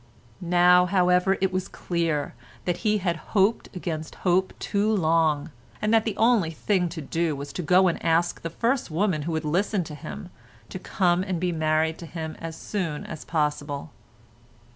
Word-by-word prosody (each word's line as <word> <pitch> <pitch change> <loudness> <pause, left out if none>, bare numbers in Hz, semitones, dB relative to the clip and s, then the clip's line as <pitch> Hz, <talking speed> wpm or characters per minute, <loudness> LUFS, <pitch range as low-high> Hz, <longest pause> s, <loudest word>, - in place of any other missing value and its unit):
Now, 180 +1 +5
however, 180 +1 +3
it 190 -1 +1
was 185 0 -1
clear 165 -4 -2 0.3
that 175 -1 0
he 210 +3 +1
had 175 -4 -1 0.2
hoped 200 +4 +2
against 160 -3 -4
hope 185 +1 +3
too 205 +1 0
long, 160 -6 +2 0.3
and 215 +1 0
that 225 -1 +4
the 220 -3 -2
only 225 -7 +3
thing 180 +2 0
to 165 -1 -6
do 165 +1 -1
was 140 +1 -7
to - - -3
go 180 +3 +4
and 170 - -1
ask 170 +1 +1
the 165 - -4
first 240 - 0
woman 170 -1 0
who - - -1
would 160 0 -2
listen 185 +5 +1
to 155 - -9
him 75 - -8 0.4
to - - -6
come 175 -1 +1
and 185 -3 -2
be 180 0 0
married 160 0 0
to 170 - -8
him 160 -1 -6
as 165 -1 -6
soon 165 -6 -4
as 155 - -7
possible. 145 -2 -2
175 Hz, 180 wpm, -25 LUFS, 160-190 Hz, 0.4 s, Now